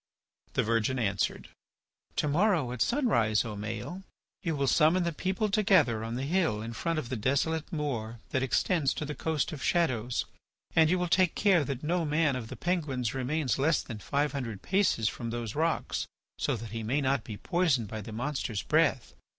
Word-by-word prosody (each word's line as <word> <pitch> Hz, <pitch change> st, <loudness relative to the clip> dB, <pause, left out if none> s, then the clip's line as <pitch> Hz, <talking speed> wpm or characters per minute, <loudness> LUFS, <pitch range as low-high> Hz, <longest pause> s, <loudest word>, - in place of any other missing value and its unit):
The -, -, +2 dB
virgin 115 Hz, +3 st, +1 dB
answered: 100 Hz, -5 st, -1 dB, 0.7 s
"To -, -, +1 dB
morrow 165 Hz, -, +2 dB
at 125 Hz, -2 st, -5 dB
sunrise, 120 Hz, -, +2 dB
O 110 Hz, -2 st, -5 dB
Maël, 115 Hz, -, -5 dB, 0.4 s
you 165 Hz, -5 st, -1 dB
will 140 Hz, -1 st, 0 dB
summon 160 Hz, +6 st, +4 dB
the 170 Hz, -, 0 dB
people 190 Hz, +7 st, -1 dB
together 190 Hz, -, +3 dB
on 115 Hz, +1 st, -4 dB
the 130 Hz, -, -2 dB
hill 160 Hz, -, +1 dB
in 115 Hz, +1 st, -5 dB
front 165 Hz, +7 st, -2 dB
of 130 Hz, -6 st, -3 dB
the 130 Hz, -, -2 dB
desolate 140 Hz, -, 0 dB
moor 120 Hz, -8 st, -3 dB
that 130 Hz, -, +1 dB
extends 140 Hz, +3 st, +1 dB
to 155 Hz, -, -3 dB
the 150 Hz, -, -4 dB
Coast 160 Hz, +2 st, -1 dB
of 150 Hz, -4 st, -7 dB
Shadows, 125 Hz, -9 st, +1 dB, 0.5 s
and 160 Hz, -1 st, +6 dB
you 180 Hz, -, +3 dB
will 180 Hz, 0 st, 0 dB
take 180 Hz, 0 st, +3 dB
care 190 Hz, -6 st, +4 dB
that 135 Hz, 0 st, -4 dB
no 170 Hz, +3 st, +1 dB
man 150 Hz, -2 st, +2 dB
of 120 Hz, -3 st, -4 dB
the -, -, -7 dB
Penguins 150 Hz, -, -1 dB
remains 135 Hz, 0 st, -1 dB
less 155 Hz, +3 st, +2 dB
than 115 Hz, -4 st, -7 dB
five 145 Hz, +7 st, 0 dB
hundred 115 Hz, -8 st, -5 dB
paces 185 Hz, -, +2 dB
from 115 Hz, +1 st, -3 dB
those 115 Hz, -2 st, -4 dB
rocks 160 Hz, +2 st, -1 dB, 0.3 s
so 145 Hz, -, +1 dB
that 115 Hz, -1 st, -7 dB
he 115 Hz, 0 st, -4 dB
may 120 Hz, +7 st, 0 dB
not 135 Hz, -4 st, +1 dB
be 110 Hz, -3 st, -7 dB
poisoned 160 Hz, -, +1 dB
by 110 Hz, +2 st, -5 dB
the 110 Hz, -, -8 dB
monster's 120 Hz, -2 st, -3 dB
breath. 155 Hz, -5 st, +2 dB
140 Hz, 190 wpm, -29 LUFS, 115-165 Hz, 0.7 s, and